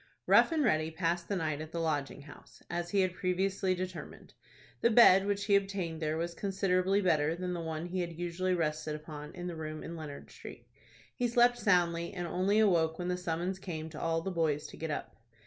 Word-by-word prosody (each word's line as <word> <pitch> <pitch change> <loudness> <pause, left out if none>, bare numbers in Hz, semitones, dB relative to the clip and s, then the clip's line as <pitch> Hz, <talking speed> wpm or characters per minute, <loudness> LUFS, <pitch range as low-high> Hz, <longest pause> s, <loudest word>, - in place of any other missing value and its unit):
Rough - - +6
and 315 -2 +1
Ready 155 - +2
passed 170 +1 -2
the 200 - 0
night 155 -4 -2
at 155 - -8
the 170 - -3
Lodging 145 -3 -2
House, 145 - -15
as 175 0 -2
he 200 +1 +2
had 185 -2 +1
previously 185 +1 0
determined. 185 0 -7 0.5
The 235 - +4
bed 200 -4 +7
which 200 0 -1
he 200 - +4
obtained 195 -5 -1
there 155 0 -1
was 170 +1 -2
considerably 195 0 +1
better 160 -3 +2
than 180 0 -3
the 170 - -3
one 160 0 -4
he 180 +1 -2
had 170 -1 -4
usually 175 +2 -1
rested 155 -2 -1
upon 150 -1 -9
in 175 -1 -6
the 175 -1 -4
room 155 -1 -6
in 170 - -6
Leonard 150 -3 -8
Street. - - -11 0.5
He 245 - 0
slept 240 +1 +4
soundly, 175 -4 +2
and 175 -1 -3
only 185 +4 +1
awoke 170 -7 +3
when 180 0 -3
the 180 - +1
summons 180 +1 -3
came 160 -4 -6
to 155 - -8
all 165 0 0
the 190 - -2
boys 155 -4 0
to - - -11
get 160 - -4
up. 145 - -4
175 Hz, 215 wpm, -31 LUFS, 160-190 Hz, 0.5 s, bed